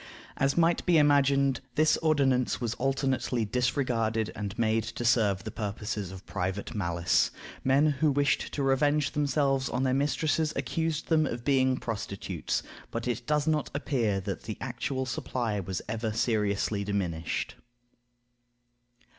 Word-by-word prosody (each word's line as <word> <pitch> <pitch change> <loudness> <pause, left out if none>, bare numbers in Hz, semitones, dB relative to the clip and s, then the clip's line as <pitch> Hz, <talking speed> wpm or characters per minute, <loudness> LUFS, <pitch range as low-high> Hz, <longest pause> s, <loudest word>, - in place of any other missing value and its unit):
As 135 +3 +1
might 170 0 +3
be 175 -2 +5
imagined, 140 -2 +3
this 155 0 +4
ordinance 140 -5 +2
was 120 -3 -1
alternately 130 -3 0
disregarded 115 -2 0
and 100 -2 -5
made 110 -1 +2
to 115 +1 -5
serve 105 -5 +3
the 110 - -5
purposes 105 -2 -4
of 95 0 -10
private 95 +5 -3
malice. 85 -4 +1 0.3
Men 135 +3 +4 0.2
who 155 - +5
wished 145 0 +1
to 140 - -1
revenge 145 +2 +2
themselves 140 -2 +1
on 125 - -1
their 130 -1 +2
mistresses 150 +3 +1
accused 165 -1 -2
them 155 -2 +3
of 120 0 -5
being 130 -2 +3
prostitutes; 110 -4 -3 0.3
but 115 +1 -4
it 120 -2 -3
does 150 -1 +2
not 155 -2 +1
appear 120 -9 0
that 95 -1 -4
the 110 - -5
actual 130 +1 -3
supply 120 -3 -2
was 95 -1 -4
ever 110 +1 -2
seriously 105 -2 0
diminished. 90 -5 -2
125 Hz, 140 wpm, -29 LUFS, 105-140 Hz, 0.3 s, be